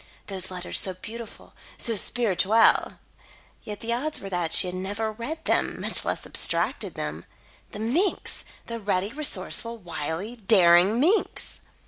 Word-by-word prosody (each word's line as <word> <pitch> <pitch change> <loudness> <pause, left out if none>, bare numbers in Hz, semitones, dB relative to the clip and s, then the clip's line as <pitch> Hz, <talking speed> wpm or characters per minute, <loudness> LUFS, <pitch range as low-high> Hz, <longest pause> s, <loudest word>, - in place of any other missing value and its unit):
Those 190 -2 -1
letters 180 -1 -1
so 190 -1 +2
beautiful, 225 +5 -10 0.2
so 230 - 0
spirituelle! 220 0 +3 0.6
Yet, 210 -1 -7
the 235 +1 -2
odds 295 +6 -2
were 195 - -8
that 175 -3 -1
she - - +4
had 180 - -4
never 205 +4 -3
read 295 +9 -6
them, - - 0
much - - +3
less - - -2
abstracted - - 0
them. - - -5 0.5
The - - -7
minx! 320 - 0 0.2
the 230 0 -5
ready, 200 +1 -1
resourceful, 270 -5 0
wily, 175 +4 -5
daring 190 0 +5
minx! 365 - +1
215 Hz, 140 wpm, -25 LUFS, 185-235 Hz, 0.6 s, daring